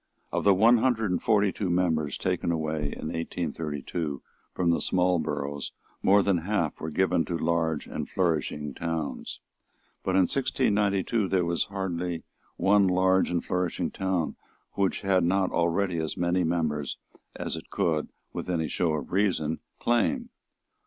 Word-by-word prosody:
Of - - -1
the 100 -1 +6
one 115 +5 +6
hundred 115 -5 +1
and 90 - 0
forty 105 -2 +3
two 95 -1 -3
members 80 -5 +1
taken - - 0
away 80 -2 -1
in 75 +2 -4
1832 80 -2 -3 0.3
from 85 -2 +1
small 90 -1 +2
boroughs 70 -2 -3 0.3
more 100 +1 +5
than 95 -3 +2
half 85 -3 -1
were 80 - -3
given 90 +1 +2
to 85 - -2
large 80 -2 0
and - - -5
flourishing 75 -5 -1
towns. 80 0 -4 0.6
But 95 - -1
in 95 - +6
1692 105 -3 +1
there 90 -2 +2
was 85 0 0
hardly 90 -3 -3 0.3
one 100 0 +4
large 95 +1 +3
and 85 -1 -1
flourishing 90 -2 -1
town 95 -4 -1 0.3
which 100 -2 0
had 95 -3 +3
not 95 +2 +2
already 85 +1 +1
as 80 -1 -3
many 90 +1 +1
members 80 -4 -1 0.4
as - - -3
it - - -9
could, 80 -3 0 0.2
with - - -5
any 80 -3 0
show 85 -3 +1
of 75 - -5
reason, 90 -5 +1 0.2
claim. 235 - +1
90 Hz, 150 wpm, -27 LUFS, 80-95 Hz, 0.6 s, the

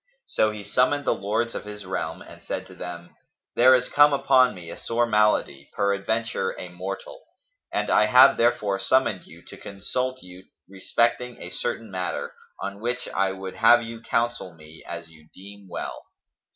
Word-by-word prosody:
So 110 - +1
he 105 -1 -7
summoned 140 +6 +1
the - - +3
lords 110 +4 -2
of - - -5
his 105 -1 -8
realm 95 - -4
and - - -14
said - - -5
to - - -14
them, 85 -1 -9 0.4
"There 130 +2 +7
is 125 0 0
come 145 0 +5
upon 130 -2 +4
me 85 -2 -9
a - - -7
sore 120 +1 0
malady, 105 -11 +1
peradventure 100 +1 -1
a 90 - -7
mortal; 95 +2 -7 0.5
and - - -1
I 105 - +5
have 130 +3 +7
therefore 105 -5 +1
summoned 120 -3 +1
you 85 +2 -15
to - - -12
consult 125 +6 -4
you 90 +1 -13 0.2
respecting 115 +5 -1
a 90 - -8
certain 110 +3 -4
matter, 90 -1 -3 0.3
on 100 0 -5
which 120 +3 -3
I 95 0 0
would 95 0 -7
have 120 +2 +6
you 115 0 -8
counsel 115 -7 -2
me 80 0 -15
as 85 -1 -7
you 80 -1 -19
deem 100 +1 -13
well." - - -5
105 Hz, 175 wpm, -25 LUFS, 95-120 Hz, 0.5 s, There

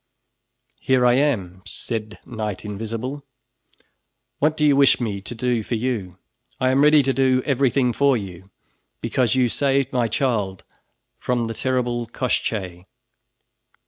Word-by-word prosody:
"Here 130 -1 +2
I 120 - +5
am," 110 -10 0
said 110 0 -5
Knight 105 -4 -5
Invisible, 115 +7 -5 1.2
"what 155 +2 +1
do 150 - +2
you 145 -2 +5
wish 140 -1 +5
me 105 -5 -3
to 120 - -8
do 120 0 0
for 115 - -3
you? 110 -7 -3 0.4
I 130 - +2
am 135 +1 +3
ready 150 0 +6
to 135 0 +1
do 130 -1 +2
everything 135 -2 +2
for 140 -1 +3
you, 95 -2 -9 0.5
because 125 -3 0
you 130 -1 +3
saved 135 +2 0
my 120 -2 +1
child 110 -5 -1 0.6
from 120 -2 -1
the 115 - -4
terrible 120 -1 -1
Koshchey." 95 -7 -3
120 Hz, 140 wpm, -22 LUFS, 110-135 Hz, 1.2 s, ready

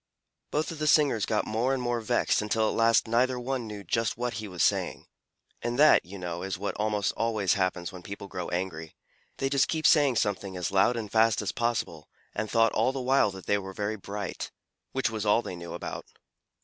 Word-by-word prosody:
Both 155 +2 -1
of 160 - -8
the 155 - 0
singers 140 -8 +4
got 110 - 0
more 120 +5 0
and - - -3
more 120 -1 -1
vexed 110 - +1
until 110 +1 +1
at - - -1
last 115 0 +4
neither 125 +2 +2
one 125 -1 -3
knew 105 -1 -7
just 115 +5 -1
what 120 0 -2
he 110 - -6
was 90 -3 -1
saying - - 0 0.6
and 120 +1 -2
that, 155 +2 +6
you 95 +3 -9
know, 85 -2 -5
is 95 -1 -3
what 100 +2 -3
almost 105 -2 0
always 110 -5 +1
happens 95 -2 -1
when 90 -2 -10
people 100 +2 -8
grow 90 -2 -5
angry. 85 -3 -4 0.4
They 135 - 0
just 135 0 +2
kept 160 -1 -2
saying 145 -5 +5
something 100 -3 -1
as 90 +2 -2
loud 100 +5 +3
and 105 -3 -5
fast 110 -1 +4
as - - -1
possible 115 -10 -2 0.2
and 110 0 -3
thought 115 +1 +3
all 115 +4 +2
the 135 - -4
while 130 -3 +3
that 95 -1 -10
they 100 - +2
were 95 -1 -7
very 105 +2 -2
bright 100 -1 -5 0.4
which 130 -3 0
was 110 -2 -3
all 105 +2 +3
they 90 - -6
knew 85 -1 -8
about - - -6
it. - - -29
110 Hz, 220 wpm, -28 LUFS, 95-120 Hz, 0.6 s, that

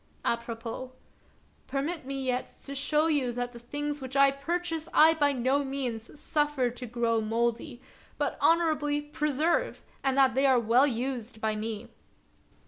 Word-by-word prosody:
— - - -22
Apropos: 235 +2 -7 0.7
Permit 285 +2 -3
me 275 -1 -3
yet 250 0 -2
to 280 - -6
show 300 +3 +2
you 290 -6 +1
that 245 0 -3
the 235 - -10
things 290 +4 -4
which 265 +1 -4
I 275 0 +6
purchase 330 +3 -3
I 320 +1 +8
by 290 -3 +2
no 265 +2 +1
means 265 -2 -4
suffer 295 -5 0
to 250 +1 -7
grow 230 -1 0
mouldy, 235 +4 -2 0.3
but - - -1
honorably 310 -3 +3
preserve, 300 - -1 0.2
and 270 -1 +1
that 265 -4 +5
they 270 +2 +3
are 260 -2 +5
well 235 +5 +4
used 245 -3 -3
by 220 0 0
me." 215 +1 -5
270 Hz, 155 wpm, -28 LUFS, 240-295 Hz, 0.7 s, I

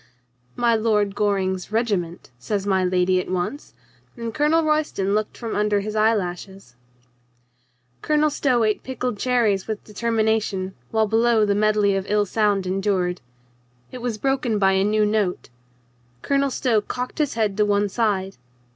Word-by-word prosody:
"My 240 -1 +2
Lord 215 -3 +1
Goring's 195 -2 -1
regiment," 200 - -2
says 200 - -3
my 190 -2 +1
lady 180 0 +2
at - - -9
once, 185 - -4 0.4
and 230 -1 -5
Colonel 305 +4 +2
Royston 305 -11 0
looked 210 0 -1
from 230 -2 -5
under 210 -1 +1
his 215 +1 -5
eyelashes. 195 - -1 1.3
Colonel 305 0 +2
Stow 255 -5 +1
ate 215 -1 +1
pickled 250 -4 -4
cherries 225 -6 +1
with 215 -2 -4
determina 220 0 0
tion, 190 -2 -4 0.2
while 220 0 +2
below 225 0 +3
the 205 - +1
medley 210 -1 +2
of 195 0 -3
ill 210 0 +2
sound 205 -1 +1
endured.... 185 -1 -1 0.7
It 255 - -7
was 240 -3 -3
broken 260 -3 0
by 195 -1 +3
a 190 0 +2
new 210 +1 +2
note. 210 -4 -1 0.7
Colonel 280 0 +1
Stow 240 -4 +1
cocked 250 +7 -5
his 295 -5 0
head 215 -3 0
to 210 - +4
one 205 0 +2
side. 195 -3 -1
210 Hz, 155 wpm, -22 LUFS, 195-230 Hz, 1.3 s, to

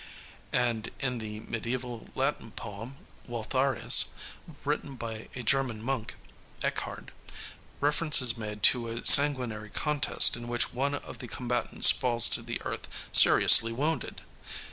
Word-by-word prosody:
And 120 -3 -2
in 125 -4 -3
the 105 -1 -8
mediæval 120 +1 -6
Latin 135 -3 -3
poem, 110 +7 -9 0.3
Waltharius, 130 +2 +1 0.6
written 145 -1 -4
by 115 -2 -8
a 125 - -7
German 125 -2 -1
monk, 120 -1 -5 0.5
Ekkehard, - - -5 0.7
reference 150 +1 +2
is 125 -3 +5
made 105 -2 -8
to 120 -2 +4
a 115 +1 -7
sanguinary 125 -7 +5
contest 150 +2 +1
in 120 0 -9
which 120 0 -2
one 140 +3 -2
of - - -10
the 125 - -8
combatants 120 0 +2
falls 120 -3 +3
to - - 0
the - - -7
earth - - -6 0.3
seriously 115 0 +6
wounded. 150 +7 -4
120 Hz, 130 wpm, -27 LUFS, 115-135 Hz, 0.7 s, seriously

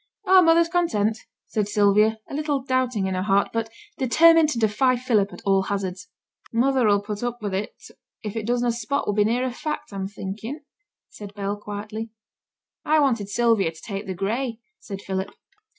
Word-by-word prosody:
'Oh, 375 -1 +7
mother's 335 0 +5
content,' 225 - 0 0.3
said 210 -2 -1
Sylvia, 210 +1 +3
a - - -10
little 290 -2 -1
doubting 255 -6 0
in 190 - -1
her 185 - -1
heart, 195 +1 +2
but 225 -1 -1 0.3
determined 320 +5 +5
to 250 - -2
defy 230 +4 +2
Philip 230 -5 +1
at - - -11
all 195 -1 +3
hazards. 190 -2 -4 0.4
'Mother 250 0 +2
'll 205 0 +3
put 205 0 -5
up 240 0 -3
with 205 -3 -4
it 195 +2 -3 0.5
if 210 -1 -5
it 220 -1 -3
does 245 0 +1
na 240 - +2
spot 235 +5 -2
would 205 - -1
be 210 - +4
nearer 245 +3 0
fact, 300 -3 -5
I'm 190 -1 -3
thinking,' 215 +8 -6 0.5
said 205 -1 -11
Bell, 200 0 -2
quietly. 210 +2 -6 0.7
'I 310 +1 +3
wanted 235 -8 +1
Sylvia 225 -6 +2
to 160 - -15
take 200 -1 -5
the 190 - -3
gray,' 225 +5 -2 0.2
said 195 -1 -8
Philip. 190 0 -3
220 Hz, 180 wpm, -24 LUFS, 200-255 Hz, 0.7 s, Oh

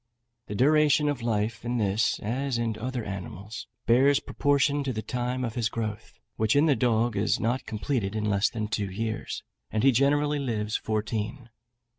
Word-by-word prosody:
The 105 - -5
duration 150 +4 +4
of 140 -4 -2
life 110 -1 -1
in 120 +1 -1
this, 105 0 +1
as 125 +4 -1
in 115 -2 -1
other 125 +1 -3
animals, 100 +2 -7 0.2
bears 135 +4 +5
proportion 145 0 +1
to 135 - -1
the 110 -2 -4
time 125 +1 -2
of 115 - -4
his 115 -3 0
growth, 110 -1 -5 0.2
which 110 +2 +2
in 145 +2 +5
the 145 -4 +4
dog 120 -2 +1
is 105 +2 +1
not 120 +3 -1
completed 110 -2 -2
in 105 -1 -1
less 105 -1 +2
than 110 -3 -3
two 105 -2 -2
years, 110 +3 -4 0.3
and 110 - -1
he 135 - +7
generally 145 +3 +2
lives 110 -5 -2
fourteen. 110 +3 -2
115 Hz, 175 wpm, -27 LUFS, 105-135 Hz, 0.3 s, he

